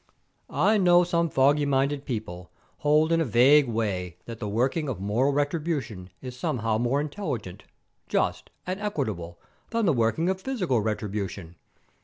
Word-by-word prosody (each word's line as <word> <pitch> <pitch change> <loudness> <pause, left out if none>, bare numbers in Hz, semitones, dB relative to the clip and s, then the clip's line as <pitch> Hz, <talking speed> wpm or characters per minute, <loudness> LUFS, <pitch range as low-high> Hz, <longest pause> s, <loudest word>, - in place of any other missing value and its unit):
"I 205 +8 +2
know 175 -1 +5
some 170 -1 0
foggy 140 +2 +3
minded 140 +1 0
people 90 -7 -5 0.3
hold 150 +2 +3
in 165 0 +3
a - - +3
vague 135 +3 +5
way 95 -6 -2
that 115 -1 -8
the 105 - -4
working 130 +8 0
of 120 - -4
moral 110 +8 +1
retribution 145 - -2
is 125 -1 -7
somehow 115 -3 -1
more 120 +4 +1
intelligent, 145 - -5 0.4
just, - - -1 0.2
and 185 +3 -4
equitable 110 - -3 0.3
than 230 -2 0
the 170 - +3
working 120 +8 +1
of 190 0 -1
physical 185 - 0
retribution. 100 -5 -4
135 Hz, 150 wpm, -26 LUFS, 110-160 Hz, 0.4 s, know